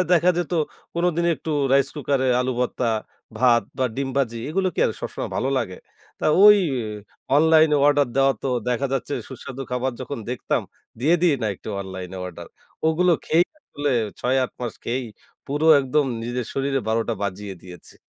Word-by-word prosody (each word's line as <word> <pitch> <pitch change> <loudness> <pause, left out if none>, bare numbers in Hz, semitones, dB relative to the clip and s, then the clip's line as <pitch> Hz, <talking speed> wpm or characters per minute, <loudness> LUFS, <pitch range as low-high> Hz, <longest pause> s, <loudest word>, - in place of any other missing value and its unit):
দেখা 175 +1 +5
যেত 175 0 -3 0.4
কোনদিন 170 0 +1
একটু 160 - -6 0.2
রাইস 135 0 +4
কুকারে 140 -3 0
আলু 130 +1 0
ভর্তা, 125 -1 0 0.5
ভাত 120 -3 +5 0.2
বা 130 - +2
ডিম 135 0 -1
ভাজি। 120 -4 0
এগুলো 190 +4 +1
কি - - -1
আর - - 0
সবসময় - - -5
ভালো 130 - 0
লাগে? 95 -7 -4 0.4
তা - - 0 0.2
ওই 210 0 +10 0.8
অনলাইনে 155 0 +5
অর্ডার 145 -1 +4
দেওয়া 135 0 +4
তো 135 - -1 0.2
দেখা 125 +3 0
যাচ্ছে 135 +2 -2 0.2
সুস্বাদু 130 0 -7
খাবার 125 +1 -1
যখন 140 - -5
দেখতাম। 125 - -1 0.4
দিয়ে 155 +7 +4
দিই 170 -5 +5
না - - +1
একটু - - -11
অনলাইনে 95 -1 -7
অর্ডার। 90 - -9 0.4
ওগুলো 175 +3 +3
খেয়েই 170 +3 +3
আসলে 145 - -3 0.3
৬-৮ 130 0 +1
মাস 120 -3 -3
খেয়েই 125 +2 -2 0.4
পুরো 145 +3 -1
একদম 140 +2 +1 0.2
নিজের 120 0 -3
শরীরে 135 0 0
১২টা 115 +1 0
বাজিয়ে 100 0 -4
দিয়েছি। 90 -1 -12
135 Hz, 165 wpm, -23 LUFS, 120-155 Hz, 0.8 s, ওই